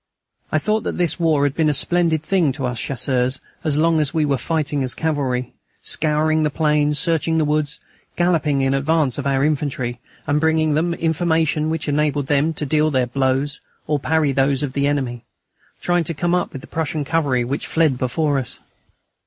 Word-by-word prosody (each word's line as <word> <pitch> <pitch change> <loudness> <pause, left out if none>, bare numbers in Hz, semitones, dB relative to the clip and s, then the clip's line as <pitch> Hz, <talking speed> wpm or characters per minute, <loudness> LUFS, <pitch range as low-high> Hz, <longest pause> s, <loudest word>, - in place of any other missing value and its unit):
I - - +2
thought 215 +7 0
that - - -4
this 175 0 +1
war 160 -4 +2
had 145 -1 +1
been 155 0 +2
a 150 - +1
splendid 165 +1 +1
thing 170 -4 +2
to 135 -1 -4
us 125 -2 -3
Chasseurs 130 -1 0 0.2
as 150 -2 0
long 165 +1 +3
as 150 +1 0
we 155 -2 +2
were 140 -1 +1
fighting 150 -1 -1
as 130 -2 -2
cavalry, 135 -6 -1 0.3
scouring 155 0 +2
the 150 - +2
plains, 150 -1 +1
searching 165 -1 +1
the 155 - +2
woods, 150 -1 -1 0.4
galloping 160 -5 +1
in 135 0 +1
advance 145 -1 +1
of 140 - -2
our 135 0 +2
infantry, 135 -5 -2 0.3
and 145 +1 +1
bringing 160 -1 +2
them 170 +3 0
information 160 -2 0
which 160 0 -3
enabled 145 -1 0
them 145 +3 +2
to 150 - -4
deal 155 +2 +2
their 130 -4 +1
blows 135 +2 -1 0.2
or 150 -1 0
parry 155 0 +1
those 135 +1 +1
of 135 -3 -3
the 140 0 +1
enemy, 130 -5 -2 0.6
trying 175 -1 +1
to 165 - -3
come 170 +4 0
up 180 - 0
with 135 - -8
the - - -13
Prussian 155 -2 -2
cavalry 140 -6 +1
which 135 +4 -3
fled 155 -6 +1
before 140 +3 0
us. 125 - -7
150 Hz, 195 wpm, -20 LUFS, 135-160 Hz, 0.6 s, long